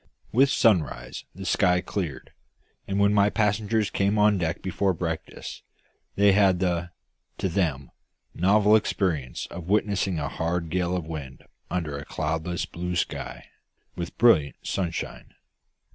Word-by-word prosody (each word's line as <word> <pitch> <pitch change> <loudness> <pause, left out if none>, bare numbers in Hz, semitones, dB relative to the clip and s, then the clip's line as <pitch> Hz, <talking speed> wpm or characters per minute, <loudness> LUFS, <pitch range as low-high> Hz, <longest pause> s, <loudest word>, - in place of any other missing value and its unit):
With 135 +4 +5
sunrise 85 - +1
the 95 +1 -7
sky 90 -1 +3
cleared; 85 -7 -4 0.6
and 100 - -1
when 100 0 +4
my 100 0 +4
passengers 105 0 +1
came 100 +2 +1
on 105 -1 +4
deck 85 -1 -2
before 95 0 0
breakfast, 80 -1 -5 0.5
they 100 0 +5
had 95 -2 +4
the 90 -1 -1 0.5
to - - -1
them 80 -8 -1 0.4
novel 105 +4 +4
experience 85 - 0
of 85 0 -7
witnessing 100 -3 +1
a 75 -2 -2
hard 85 +2 -2
gale 90 0 0
of 85 - -4
wind 75 -5 -7 0.2
under 80 -5 -2
a - - -7
cloudless 80 +3 -2
blue 90 +1 -4
sky, 65 -7 -3 0.5
with 85 -1 -6
brilliant 85 -13 +4
sunshine. 85 -3 -4
90 Hz, 135 wpm, -26 LUFS, 80-100 Hz, 0.6 s, With